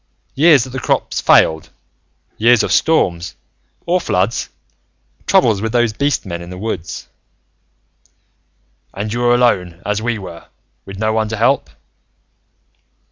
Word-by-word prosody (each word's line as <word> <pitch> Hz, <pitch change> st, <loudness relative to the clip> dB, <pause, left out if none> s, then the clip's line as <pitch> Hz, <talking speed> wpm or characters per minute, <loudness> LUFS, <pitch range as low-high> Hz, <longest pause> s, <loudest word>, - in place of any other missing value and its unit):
"... -, -, -45 dB
years 145 Hz, -3 st, +5 dB
that 130 Hz, -, -9 dB
the 130 Hz, -, -4 dB
crops -, -, -1 dB
failed. 80 Hz, -1 st, +3 dB, 0.7 s
Years 120 Hz, +1 st, +4 dB
of -, -, -2 dB
storms, 90 Hz, -, +1 dB, 0.5 s
or 180 Hz, +1 st, +1 dB
floods. 95 Hz, -, -1 dB, 0.8 s
Troubles 110 Hz, -6 st, +3 dB
with 110 Hz, +1 st, -3 dB
those 120 Hz, -2 st, +2 dB
beast 140 Hz, 0 st, -1 dB
men 85 Hz, -2 st, -5 dB
in 85 Hz, -, -10 dB
the 90 Hz, -, -8 dB
woods. 95 Hz, -5 st, -5 dB, 1.9 s
"And 105 Hz, +2 st, -4 dB
you 120 Hz, -, -2 dB
were 120 Hz, 0 st, +3 dB
alone, 90 Hz, -9 st, +1 dB
as 105 Hz, +1 st, -1 dB
we 120 Hz, 0 st, -1 dB
were, 85 Hz, -4 st, -10 dB, 0.4 s
with 95 Hz, 0 st, -9 dB
no 110 Hz, +1 st, 0 dB
one 110 Hz, -1 st, 0 dB
to 110 Hz, -, -4 dB
help. 120 Hz, -, +1 dB
110 Hz, 140 wpm, -17 LUFS, 90-120 Hz, 1.9 s, years